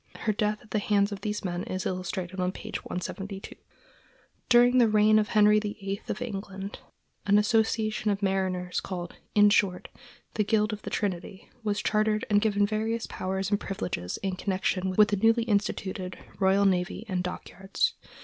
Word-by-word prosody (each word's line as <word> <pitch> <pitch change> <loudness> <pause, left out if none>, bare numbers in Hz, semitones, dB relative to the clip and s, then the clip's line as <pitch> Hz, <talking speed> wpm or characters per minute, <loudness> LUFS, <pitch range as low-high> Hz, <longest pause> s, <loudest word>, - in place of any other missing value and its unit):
Her 215 - +1
death 210 +1 0
at 215 - -20
the 215 - +1
hands 205 0 +2
of 200 -2 -6
these 210 -1 -3
men 175 -1 -2
is 185 0 -4
illustrated 185 0 -3
on 180 0 +1
page - - -6
172. 195 +2 -6 1.0
During 245 +1 +6
the 235 - +6
reign 215 0 +5
of 210 - 0
Henry 210 0 +5
VIII 205 -1 -4
of - - -3
England, 195 -3 -6 0.5
an 200 +1 +5
association 220 0 +1
of 200 0 -1
mariners 185 -2 0
called, 175 -2 -6 0.2
in 205 0 +6
short, 190 -3 +1 0.4
the 215 - +1
Guild 215 +1 +1
of 210 - -6
the - - -6
Trinity 190 -1 -4
was 210 -1 -1
chartered 215 0 +1
and 205 0 +5
given 205 -2 +2
various 220 +2 -1
powers 190 +1 -3
and 205 - +2
privileges 175 - -4
in 190 -1 -1
connection 190 -1 -1
with 210 -1 +6
the 205 - +1
newly 225 +3 +3
instituted 200 -4 -2 0.2
royal 195 +1 +4
navy 185 +3 0
and 185 -3 -1
dockyards. 190 +1 -2
205 Hz, 170 wpm, -28 LUFS, 190-215 Hz, 1.0 s, During